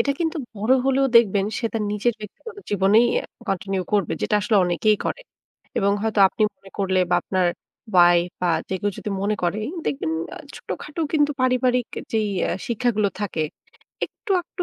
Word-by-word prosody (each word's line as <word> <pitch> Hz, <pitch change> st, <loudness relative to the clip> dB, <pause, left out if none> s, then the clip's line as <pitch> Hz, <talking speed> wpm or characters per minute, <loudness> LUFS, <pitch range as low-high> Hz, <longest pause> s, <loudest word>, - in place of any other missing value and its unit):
এটা 280 Hz, -, +2 dB
কিন্তু 330 Hz, 0 st, 0 dB, 0.2 s
বড় 215 Hz, +5 st, +2 dB
হলেও 270 Hz, 0 st, +3 dB
দেখবেন 205 Hz, -4 st, +4 dB
সে 235 Hz, -, -1 dB
তার 225 Hz, -, -1 dB
নিজের 215 Hz, +3 st, +1 dB
ব্যক্তিগত 315 Hz, -, -10 dB
জীবনেই 205 Hz, +4 st, +4 dB, 0.2 s
আ -, -, -11 dB, 0.2 s
continue 195 Hz, 0 st, -1 dB
করবে। 205 Hz, -2 st, +2 dB
যেটা -, -, +1 dB
আসলে 210 Hz, +1 st, +2 dB
অনেকেই 180 Hz, +5 st, +2 dB
করে। -, -, -2 dB, 0.6 s
এবং 200 Hz, 0 st, +3 dB
হয়তো 220 Hz, -2 st, +1 dB
আপনি 215 Hz, -, -2 dB
মনে 195 Hz, -, -17 dB
করলে 190 Hz, -1 st, +1 dB
বা -, -, +4 dB
আপনার 185 Hz, -2 st, +1 dB, 0.5 s
ওয়াইফ 175 Hz, -1 st, +5 dB
বা 180 Hz, -, +2 dB, 0.2 s
যে -, -, -2 dB
কেউ 205 Hz, -, 0 dB
যদি 210 Hz, -, -4 dB
মনে 210 Hz, +1 st, +1 dB
করে, 175 Hz, +3 st, +1 dB
এই 295 Hz, -, -5 dB
দেখবেন 215 Hz, -, -1 dB, 0.4 s
ছোটখাটো 305 Hz, +2 st, -6 dB
কিন্তু 295 Hz, -2 st, +3 dB
পারিবারিক 250 Hz, -1 st, +2 dB
এ -, -, -10 dB
যেই 220 Hz, -2 st, +1 dB, 0.2 s
আ -, -, 0 dB, 0.2 s
শিক্ষাগুলো 230 Hz, -3 st, +1 dB
থাকে, 185 Hz, -6 st, -1 dB, 0.6 s
একটু-আকটু 370 Hz, -2 st, -3 dB
210 Hz, 170 wpm, -23 LUFS, 195-250 Hz, 0.6 s, ওয়াইফ